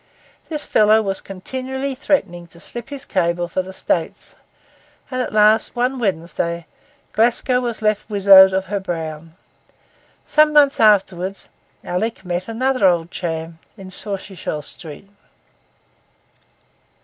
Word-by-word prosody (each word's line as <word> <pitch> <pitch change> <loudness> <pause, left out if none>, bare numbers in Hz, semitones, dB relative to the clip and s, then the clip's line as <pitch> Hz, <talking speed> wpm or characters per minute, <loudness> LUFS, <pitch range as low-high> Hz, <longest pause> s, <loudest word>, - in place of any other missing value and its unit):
This 300 -2 -2
fellow 215 +1 +4
was 195 -1 -2
continually 260 +8 -5
threatening 195 -11 -1
to 170 - -16
slip 240 +7 -7
his 280 -1 -8
cable 175 -2 0
for 185 - -2
the 185 +1 -9
States, 170 -3 -3 0.8
and 255 0 -1
at - - -3
last, 215 +2 +3
one 250 +2 0
Wednesday, 170 -4 -2 0.5
Glasgow 240 +2 +2
was 235 -3 -4
left 215 0 0
widowed 195 -2 +7
of 190 0 -1
her 200 +2 -3
Brown. 165 -3 -6 0.9
Some 305 0 +3
months 290 -2 +4
afterwards, 195 -3 +2 0.3
Alick 190 +2 -3
met 180 +1 -3
another 255 -1 +1
old 170 -1 +1
chum 165 -1 -5 0.2
in 190 -2 -11
Sauchiehall 190 -6 -4
Street. 160 +4 -8
195 Hz, 125 wpm, -20 LUFS, 175-240 Hz, 0.9 s, widowed